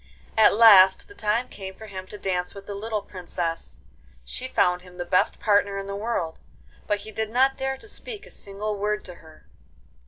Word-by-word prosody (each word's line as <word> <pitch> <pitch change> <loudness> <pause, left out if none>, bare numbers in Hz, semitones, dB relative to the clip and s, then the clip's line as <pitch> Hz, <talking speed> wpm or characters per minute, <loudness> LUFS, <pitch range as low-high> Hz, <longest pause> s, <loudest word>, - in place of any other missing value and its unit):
At 220 -2 +6
last 195 -4 +7
the 405 - -14
time 230 - 0
came 190 -4 -8
for 220 - -11
him 190 -3 -8
to 210 - -9
dance 180 -2 -2
with 200 0 -10
the 205 - -6
little 210 +1 -3
Princess. 175 -3 -5 0.5
She - - -5
found 180 0 +2
him 180 0 -15
the 175 - -4
best 180 +1 +2
partner 200 -2 +2
in 195 - -4
the 200 0 -5
world, 200 -6 -3 0.5
but 205 -1 0
he 215 +1 -9
did 220 0 -3
not 265 +4 +3
dare 265 0 -2
to 425 - -13
speak 430 0 -6
a - - -15
single 205 +1 -4
word 210 +1 -1
to 180 - -8
her. 160 -1 -17
200 Hz, 205 wpm, -25 LUFS, 185-220 Hz, 0.5 s, last